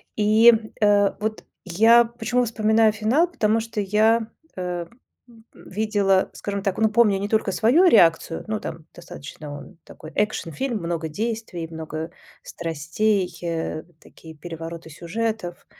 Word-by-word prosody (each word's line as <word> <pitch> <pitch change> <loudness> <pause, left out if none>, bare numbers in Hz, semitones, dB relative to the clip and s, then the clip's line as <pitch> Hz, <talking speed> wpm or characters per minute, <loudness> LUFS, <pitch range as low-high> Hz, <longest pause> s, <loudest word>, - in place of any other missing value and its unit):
И, 220 +3 +6 0.3
э, 205 -1 +4
вот 215 +1 -3 0.2
я 225 +6 +5
почему 240 +1 -1
вспоминаю 220 0 +3
финал, 230 +11 +1
потому 220 -6 +1
что 225 -2 -4
я, 220 +3 +2 0.3
э, 180 -2 -4 0.7
видела, 200 -2 0
скажем 200 -1 -4
так 195 -2 -2
ну 220 0 +3
помню 215 -3 +3
не 200 +1 -4
только 215 -3 0
свою 275 +12 +4
реакцию 165 - +4
ну 215 0 -2
там 160 -1 -8
достаточно 150 -3 -10
он 165 +4 -13
такой, 155 - -12
а, - - -3
экшн-фильм, 215 - -2
много 170 -2 -3
действий, 215 -2 -4
много 160 0 -6 0.3
страстей, 180 +5 -1
э, 165 -2 -3
вот 170 -2 -29
такие 160 -1 -15
перевороты 165 +1 -8
сюжетов. 180 +3 -4
205 Hz, 135 wpm, -23 LUFS, 170-220 Hz, 0.7 s, И